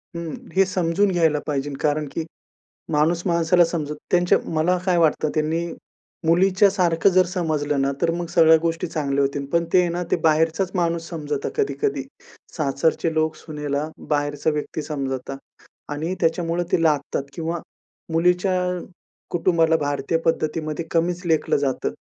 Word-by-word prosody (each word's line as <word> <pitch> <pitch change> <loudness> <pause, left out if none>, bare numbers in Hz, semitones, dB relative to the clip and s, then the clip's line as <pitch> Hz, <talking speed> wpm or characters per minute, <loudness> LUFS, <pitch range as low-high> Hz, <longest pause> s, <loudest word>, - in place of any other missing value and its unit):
हं. 170 -2 -4 0.2
हे 195 0 +5
समजून 185 +2 +1
घ्यायला 165 -4 +2
पाहिजे 145 -1 -1
कारण 150 0 +1
की 165 - -3 0.7
माणूस 160 +3 +2
माणसाला 170 0 +4
समजत 155 -3 -3 0.2
त्यांच्या 175 0 +4 0.2
मला 165 +4 +2
काय 180 -2 +3
वाटतं, 155 -1 +2
त्यांनी 160 +2 0 0.6
मुलीच्या 190 +4 +4
सारखं 180 -1 +2
जर 185 0 +4
समजलं 155 -6 -1
ना, 135 - +1
तर 170 - +3
मग 175 0 -3
सगळ्या 160 -2 +6
गोष्टी 165 +1 -1
चांगल्या 140 -4 -1
होतील. 140 0 -2
पण 170 0 +2
ते 185 - +6
आहे 175 - +1
ना 175 +1 -2
ते - - +3
बाहेरचाच 160 +3 +2
माणूस 170 -2 -1
समजतात 150 -4 -3
कधी-कधी. 140 0 0 0.5
सासरचे 155 +2 0
लोक 155 0 +1
सुनेला 150 -1 -4 0.2
बाहेरचा 145 0 0
व्यक्ती 150 +1 -3
समजतात 135 -3 -4 0.6
आणि 160 +5 -2
त्याच्यामुळे 170 +1 0
ते 165 - +3
लादतात 150 -3 +1
किंवा 165 +2 -3 0.5
मुलीच्या 180 +3 +2 0.7
कुटुंबाला 165 -2 +3
भारतीय 145 +1 -1
पद्धतीमध्ये 155 0 -1
कमीच 175 +1 0
लेखलं 160 -2 +2
जातं. 140 -2 -1
165 Hz, 145 wpm, -22 LUFS, 150-175 Hz, 0.7 s, सगळ्या